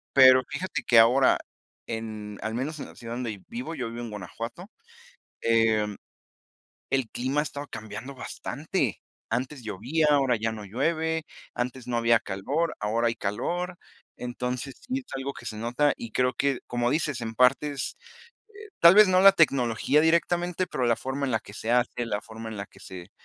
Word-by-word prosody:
Pero 130 -1 +8
fíjate 165 +6 -3
que, 115 -2 +6
ahora, 125 +4 +6 0.5
en, 110 -2 -5
al 110 - -3
menos 145 +6 -3
en - - -5
la - - -15
ciudad 115 -1 -7
donde 115 -5 -4
vivo, 235 -8 -5
yo 125 -5 -3
vivo 115 +1 -6
en 120 - -5
Guanajuato, 115 - -7 0.7
em, 110 -3 +2 0.9
el 135 -4 0
clima 130 +4 -1
ha 150 - +2
estado 145 -1 -6
cambiando 110 +6 -8
bastante. 135 - -3 0.3
Antes 125 +3 -2
llovía, 120 - 0
ahora 135 -4 +4
ya 110 +1 -1
no 105 -2 -7
llueve, 160 - -1 0.3
antes 125 0 -4
no 120 -1 0
había 115 -1 +4
calor, 135 +13 -2
ahora 115 +3 +1
hay 115 - 0
calor. 175 - -3 0.4
Entonces, 125 +2 -4
sí 255 +1 -2
es 260 - -13
algo 135 +1 -3
que - - -12
se 110 - -4
nota 125 +6 +1
y 115 -1 -8
creo 125 0 +1
que, 140 -1 0
como 120 0 0
dices, 145 -3 0
en 115 -1 -4
partes, 135 +2 +2 0.6
eh, 425 0 -10
tal 170 +2 +9
vez 210 -2 +8
no 185 0 +4
la 195 0 +10
tecnología, 140 - +3
directamente, 175 +2 +1
pero 125 - -2
la 115 -1 +3
forma 135 +2 -3
en 130 - -1
la 110 - +1
que 105 - -13
se 110 - -4
hace, 120 0 +1
la 105 -2 -2
forma 110 +1 -8
en 110 - -7
la 100 - -5
que - - -19
se 90 -2 -10
125 Hz, 185 wpm, -27 LUFS, 115-150 Hz, 0.9 s, la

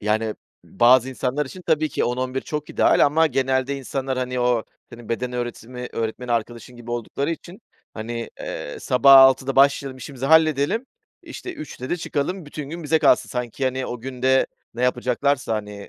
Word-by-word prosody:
Yani, 110 +1 0 0.3
bazı 125 +2 +4
insanlar 130 +2 -2
için 180 +6 -10
tabii 155 -2 +1
ki - - -1
10-11 130 +2 -2
çok 150 -1 -5
ideal - - +4
ama 160 +3 +3
genelde 130 0 0
insanlar, 135 0 -3
hani, 125 0 -2
o 120 -2 +1 0.3
senin 120 -1 -12
beden 125 +2 -2
öğretimi 125 0 -5
öğretmeni 115 +2 -3
arkadaşın 120 +2 -3
gibi 120 0 -10
oldukları 120 +6 -3
için, 175 +6 -7 0.3
hani, 115 +1 -5
eee, - - -6
sabah 135 +2 +6
6’da 135 0 +5
başlayalım, 135 -1 +3
işimizi 130 +1 -6
halledelim, 160 - +3 0.4
işte, 370 -1 -8
3’te 285 - -8
de 175 - +1
çıkalım, 160 +2 -3
bütün 145 -1 -7
gün 170 0 -6
bize 160 +2 +2
kalsın. 140 -4 +3
Sanki, 125 +1 -4
hani, 130 0 -1
o 120 - -6
gün 125 0 -8
de 130 0 +4 0.3
ne 120 - -4
yapacaklarsa, 125 0 0
hani, 105 -1 -6
130 Hz, 170 wpm, -22 LUFS, 120-140 Hz, 0.4 s, sabah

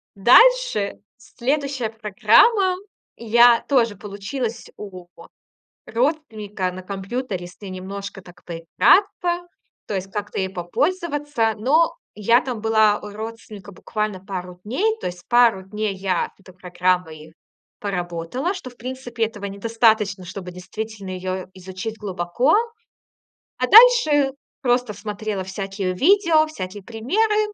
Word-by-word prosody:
Дальше 250 - +5 0.2
следующая 270 0 -2
программа. 225 - +3 0.4
Я 235 +1 +5
тоже 235 -6 +2
получилась 210 +5 -5
у 185 -4 -9 0.8
родственника 220 - -2
на 185 +1 -8
компьютере, 195 +1 -4
если 180 +3 -11
немножко 195 +1 -7
так 175 0 -17
поиграться, 345 - +2 0.4
то - - -4
есть 190 0 -4
как-то 205 -1 -4
ей 190 -1 -1
попользоваться. 290 - -1
Но 315 +9 +2 0.2
я 230 +4 +3
там 245 -5 -5
была 220 -2 +3
у 210 - -8
родственника 215 -1 -9
буквально 210 0 -4
пару 180 -2 -7
дней, 410 - 0
то - - -2
есть 175 -1 -9
пару 240 -6 +4
дней 210 +1 -3
я 190 -2 -1
эту 190 -1 -16
программой 175 -3 -2 0.5
поработала, 180 - -3
что, 375 -10 -8
в 245 - -20
принципе, 245 -2 -3
этого 210 -2 -7
недостаточно, 210 -1 +1
чтобы 180 0 -7
действительно 195 +3 -7
её 185 0 -4
изучить 190 +4 -7
глубоко. 195 - 0 1.0
А - - 0
дальше 425 - +7 0.3
просто 245 -3 +1
смотрела 205 -1 -4
всякие 195 0 -4
видео, 325 - +4
всякие 200 -9 -7
примеры, 420 - 0
215 Hz, 120 wpm, -22 LUFS, 190-255 Hz, 1.0 s, дальше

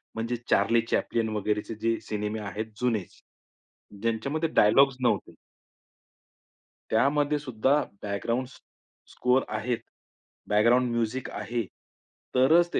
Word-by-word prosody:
म्हणजे 115 +2 -2
Charlie 115 0 +4
Chaplin 115 -1 0
वगैरेचे 105 +2 -2
जे 115 0 +1
सिनेमे 105 0 -3
आहेत 105 +1 -4 0.2
जुनेच, 115 -7 -1 0.8
ज्यांच्यामध्ये 140 +8 -1
डायलॉग्स 135 +6 +5
नव्हते 120 - 0 1.6
त्यामध्ये 145 +5 +2
सुद्धा 130 -1 +1 0.3
बॅकग्राउंड 115 +5 -2
स्क 125 - -17 0.5
स्कोर 125 +1 +2
आहेत, 120 +2 -1 0.7
बॅकग्राउंड 120 +4 +4
म्युझिक 120 +2 -2
आहे, 120 -1 -3 0.7
तरच 160 +7 +5
ते - - +3
115 Hz, 105 wpm, -27 LUFS, 110-130 Hz, 1.6 s, डायलॉग्स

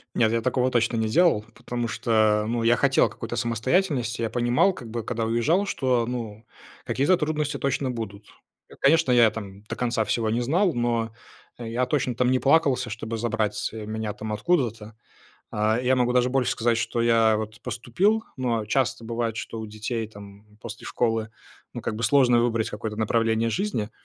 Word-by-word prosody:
Нет, 110 -2 +3
я 115 - +1
такого 130 +1 +1
точно 115 -1 +1
не 110 -1 0
делал. 120 -3 +3
Потому 120 -1 -4
что, 110 -2 +2
ну, 120 0 -1
я 120 +1 +4
хотел 140 -1 +3
какой-то 120 0 -6
самостоятельности. 120 - 0
Я 115 - -1
понимал, 120 +10 +2
как 120 -10 -10
бы, 115 0 -3
когда 115 0 -2
уезжал, 120 - +1
что, 125 -9 0
ну, 115 -3 -5 0.4
какие-то 145 +8 +2
трудности 150 -2 -2
точно 135 -1 -1
будут. 105 -4 -6 0.4
Я - - -14
конечно, 155 -2 +4
я, 120 -2 +6
там, 100 -2 -8
до 105 - -7
конца 120 -2 0
всего 115 0 0
не 115 +2 0
знал, 170 +9 +2
но 115 -2 -1 0.5
я 120 +1 -2
точно, 130 -4 0
там, 125 +1 +1
не 130 - +3
плакался, 140 -4 +2
чтобы 110 +2 -5
забрать 110 -2 -1
меня, 110 -1 -4
там, 110 +1 -6
откуда-то. 115 -6 -1 0.5
А, 110 +2 +1
я 130 +1 +2
могу 125 -1 +2
даже 125 0 +2
больше 130 -1 +1
сказать, 115 0 +1
что 120 0 -1
я, 115 -2 +4
вот, 110 +1 -6
поступил. 195 - 0
Но 120 -4 -1
часто 115 0 0
бывает, 115 -1 -2
что 115 0 -5
у 110 - -6
детей, 110 +2 -4
там, 105 0 -14
после 110 -1 -8
школы, 115 -2 -1 0.4
ну, - - -4
как 110 - -3
бы, 115 - -5
сложно 120 -1 +4
выбрать 115 -2 0
какое-то 105 +1 -5
направление 115 +1 +1
жизни. 175 - -2
115 Hz, 180 wpm, -25 LUFS, 110-125 Hz, 0.5 s, я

